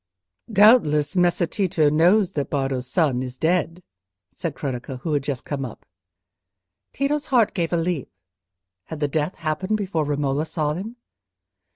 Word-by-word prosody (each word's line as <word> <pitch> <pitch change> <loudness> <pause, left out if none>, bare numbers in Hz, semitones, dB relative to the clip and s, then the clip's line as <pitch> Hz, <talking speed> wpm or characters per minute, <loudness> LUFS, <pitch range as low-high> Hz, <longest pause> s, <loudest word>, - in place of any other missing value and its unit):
"Doubtless 195 -8 +5
Messer 175 -1 +3
Tito 170 -3 +1
knows 180 +5 +4
that 145 -6 -3
Bardo's 135 -3 -2
son 135 -4 +1
is 130 0 -6
dead," 175 +3 0 0.5
said 165 -5 -5
Cronaca, 130 -2 -5
who 160 0 -2
had 145 - +1
just 135 -2 -4
come 140 -2 -3
up. 125 - -8 1.1
Tito's 290 +2 -1
heart 240 -5 +3
gave 170 -4 -1
a 170 - +2
leap—had 95 - -7
the 145 - +1
death 150 +5 -1
happened 175 +7 -1
before 190 -6 -1
Romola 145 +1 -1
saw 150 -2 -1
him? 205 +8 -6
155 Hz, 145 wpm, -23 LUFS, 135-180 Hz, 1.1 s, Doubtless